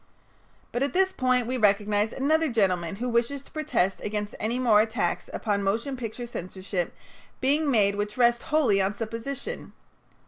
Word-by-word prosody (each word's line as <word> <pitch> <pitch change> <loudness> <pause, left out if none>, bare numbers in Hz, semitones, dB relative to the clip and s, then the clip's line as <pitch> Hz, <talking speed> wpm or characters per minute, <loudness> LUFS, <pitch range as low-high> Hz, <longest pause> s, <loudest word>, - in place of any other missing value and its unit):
But 240 - -2
at 280 - 0
this 380 +1 +3
point 255 -5 +1
we 255 +2 -2
recognize 210 0 +2
another 310 +2 +1
gentleman 185 -6 +1
who 240 +5 -3
wishes 240 +4 0
to - - -18
protest 265 - 0
against 210 0 -3
any 225 +3 -1
more 230 -5 +5
attacks 210 -6 -1
upon 205 -3 -1
motion 225 +8 -1
picture 240 -1 -5
censorship 185 -4 -4 0.4
being 290 +3 +2
made 205 -6 +3
which 205 +2 -3
rest 240 -1 +4
wholly 290 -11 +3
on 195 +2 0
supposition. 230 +5 -5
230 Hz, 160 wpm, -26 LUFS, 205-255 Hz, 0.4 s, more